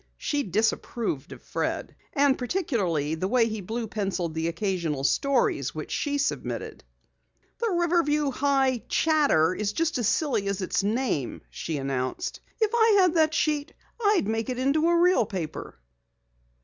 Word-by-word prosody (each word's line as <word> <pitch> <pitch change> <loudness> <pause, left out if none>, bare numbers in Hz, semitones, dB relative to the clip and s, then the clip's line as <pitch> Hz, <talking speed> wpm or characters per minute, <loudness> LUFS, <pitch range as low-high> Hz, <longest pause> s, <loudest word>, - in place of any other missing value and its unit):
She 290 -1 -1
disapproved 215 - -1
of - - -11
Fred, - - -2
his - - -23
pimples, - - -34 0.2
and 275 -1 +3
particularly 215 - -1
the 160 +4 -1
way 235 +2 +3
he 215 -2 -4
blue 225 +5 -3
penciled 195 -6 -2
the 160 +1 -1
occasional 170 -5 -2
stories 275 - +1
which - - -6
she 285 -1 -1
submitted. 280 - -3 0.8
"The 465 - 0
Riverview 335 -5 +2
High 265 -2 +1
Chatter 285 - +3
is 205 +1 -2
just 325 -1 0
as 230 - +1
silly 255 -8 +1
as 200 0 -1
its 190 +1 -1
name," 210 - -1
she 160 -2 -4
announced. 135 -2 -3 0.2
"If 440 -2 +2
I 450 -3 +5
had 365 -3 +4
that 315 -2 +3
sheet 300 0 0 0.3
I'd 410 - +3
make 225 +2 -1
it 250 - -2
into 285 +6 +2
a 340 0 +3
real 355 - +4
paper." 160 - -5
245 Hz, 160 wpm, -26 LUFS, 185-305 Hz, 0.8 s, I